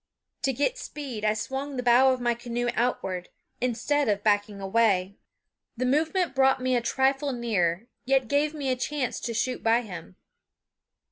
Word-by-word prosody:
To 270 - +1
get 290 - -1
speed 265 -8 -6
I 215 0 +2
swung 270 +5 -4
the 250 - -2
bow 250 +2 +6
of 255 -1 -2
the 240 0 +2
canoe 240 +1 -3
outward, 190 -7 -1 0.3
instead 250 +3 0
of 205 -1 0
backing 205 -1 +1
away. 195 -2 +2 0.6
The 255 - -1
movement 320 +6 +1
brought 265 0 +3
me 255 0 +1
a 240 - +2
trifle 270 +4 +1
nearer, 205 -6 0 0.2
yet 265 -1 +2
gave 290 +4 +1
me 275 -3 -1
a - - +1
chance 260 0 -2
to 230 -1 -4
shoot 250 +2 -1
by 230 +1 +3
him. 170 - -9
245 Hz, 165 wpm, -27 LUFS, 215-270 Hz, 0.6 s, bow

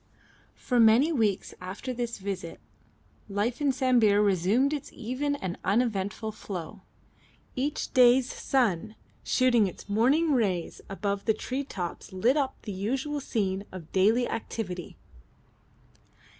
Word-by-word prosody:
For 250 -2 0
many 230 +8 +6
weeks 220 - 0
after 195 +8 -5
this 235 -1 -3
visit 190 -4 -5 0.7
life 210 +7 -1
in 285 -2 +3
Sambir 245 -6 +3
resumed 205 - +2
its 290 - -5
even 255 +5 -2
and 190 -10 -5
uneventful 210 0 0
flow. 195 -1 -7 0.7
Each 285 +3 -2
day's 250 -1 +5
sun 220 -5 0 0.3
shooting 240 -5 +3
its 180 - -9
morning 265 +10 +3
rays 195 -9 0
above 200 0 -3
the 220 - +2
tree 260 +5 -3
tops 185 -7 -6
lit 225 +8 +2
up 280 -3 -1
the 210 - -5
usual 255 +10 -2
scene 200 -7 -1
of 175 -4 -10
daily 220 +6 +3
activity. 185 -6 -5
220 Hz, 125 wpm, -28 LUFS, 195-255 Hz, 0.7 s, many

